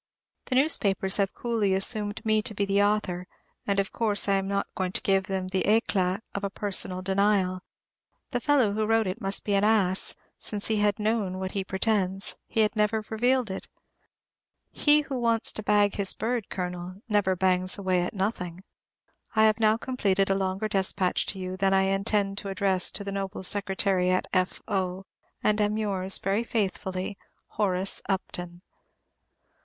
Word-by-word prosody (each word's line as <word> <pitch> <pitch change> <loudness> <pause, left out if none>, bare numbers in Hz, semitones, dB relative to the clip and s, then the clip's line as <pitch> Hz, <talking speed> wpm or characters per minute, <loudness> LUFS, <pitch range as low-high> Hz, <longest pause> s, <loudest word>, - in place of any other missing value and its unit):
The 255 - -2
newspapers 200 -9 +2
have 200 -1 0
coolly 220 -5 0
assumed 205 +2 0
me 215 0 +3
to 215 - -4
be 200 - 0
the 200 0 +2
author, 205 -3 0 0.4
and 200 -1 +1
of 195 - -1
course 210 -4 0
I 200 - +3
am 195 0 0
not 200 0 0
going 185 -1 -2
to - - 0
give 195 -1 +2
them 190 -1 -3
the 190 0 0
éclat 200 -3 +2
of 200 - -4
a 200 - -1
personal 190 -2 -1
denial. 190 -1 +1 0.7
The 245 - 0
fellow 255 -5 +2
who 215 0 -1
wrote 225 0 +3
it 190 +5 -4
must 195 -1 0
be 205 - 0
an 200 0 +3
ass; 200 -4 +2 0.2
since 205 0 -2
had 210 -2 +2
he 210 - -5
known 210 -4 0
what 190 0 -4
he 195 - -2
pretends, 190 0 +1
he 225 - +1
had 215 +1 +1
never 215 +1 +1
revealed 245 0 +1
it. 190 - -6 1.0
He 300 0 +4
who 275 -3 -4
wants 230 -1 +2
to - - -7
bag 205 -1 +3
his 200 -2 +1
bird, 230 0 -2
Colonel, 180 0 -5
never 205 -4 +2
bangs 185 0 +2
away 185 -2 +1
at 180 - -3
nothing. 185 -3 -3 0.7
I 220 - +5
have 215 0 +4
now 215 0 +4
completed 200 -6 0
a - - +4
longer 195 +2 -1
despatch 190 -2 0
to - - -3
you 185 0 -4
than 195 0 +2
I 190 - +4
intend 195 +1 0
to 200 - -6
address 190 -1 +1
to 200 - -5
the 200 - -5
Noble 195 -1 -4
Secretary 195 -1 +2
at 185 0 +1
F. 185 -1 0
O., 190 -2 -2 0.4
and 215 0 +2
am 210 +1 +1
yours, 195 -3 -1
very 200 +4 0
faithfully, 195 -3 -3 0.3
Horace 195 -2 0
Upton. 180 -2 -4
200 Hz, 180 wpm, -27 LUFS, 190-215 Hz, 1.0 s, I